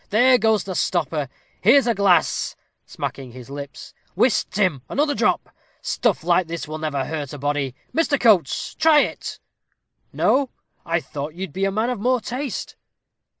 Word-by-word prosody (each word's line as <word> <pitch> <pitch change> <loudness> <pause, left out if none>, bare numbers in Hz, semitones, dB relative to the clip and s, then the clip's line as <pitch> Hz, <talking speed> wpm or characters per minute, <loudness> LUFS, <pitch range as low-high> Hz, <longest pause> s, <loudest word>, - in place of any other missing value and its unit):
there 245 +4 +5
goes 220 -1 +2
the 190 - -5
stopper 155 -6 -1 0.3
here's 260 +7 +6
a 235 - +2
glass" 200 -3 +2 0.3
smacking 130 -3 -6
his 130 +1 -11
lips 140 0 -8 0.2
"whist, 245 -4 +2
Tim, 185 -10 0
another 290 +1 +1
drop - - 0 0.3
stuff 220 -9 0
like 175 +1 +2
this 165 -2 -5
will 155 +1 -5
never 145 -4 -2
hurt 150 -4 -5
a - - -6
body. 145 -2 -2 0.2
Mr. 320 -3 +1
Coates, 200 - +3
try 310 -2 +5
it - - -4 0.7
no 270 -1 +2 0.4
I 165 0 +1
thought 145 +2 -6
you'd 185 -4 -6
be 195 +3 0
a 195 - 0
man 220 +5 0
of 245 - -4
more 250 +4 +2
taste." 255 +2 -5
185 Hz, 160 wpm, -22 LUFS, 145-240 Hz, 0.7 s, here's